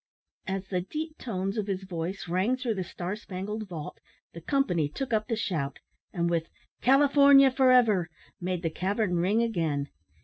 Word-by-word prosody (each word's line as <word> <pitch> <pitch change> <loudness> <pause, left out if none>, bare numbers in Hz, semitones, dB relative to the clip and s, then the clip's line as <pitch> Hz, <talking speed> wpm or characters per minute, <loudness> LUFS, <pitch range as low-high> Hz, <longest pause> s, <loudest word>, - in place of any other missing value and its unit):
As 190 0 -3
the 180 -2 -1
deep 310 - -6
tones 195 -2 -3
of 210 - -3
his 195 -1 -2
voice 180 +1 -5
rang 190 +9 +1
through 250 -3 -1
the 190 -3 -3
star 180 +2 -5
spangled 210 +1 -6
vault, 160 -4 -7 0.3
the 170 - -9
company 175 - +1
took 250 - -4
up 215 -1 +1
the 230 - 0
shout, 155 -11 -2 0.3
and 170 -2 -1
with 165 -1 -1 0.3
"California 275 0 +6
for 260 0 +4
ever!" 215 -9 +4 0.3
made 180 0 -3
the 165 - -1
cavern 190 +1 -1
ring 200 +7 +2
again. 160 -10 -1
195 Hz, 170 wpm, -28 LUFS, 175-235 Hz, 0.3 s, California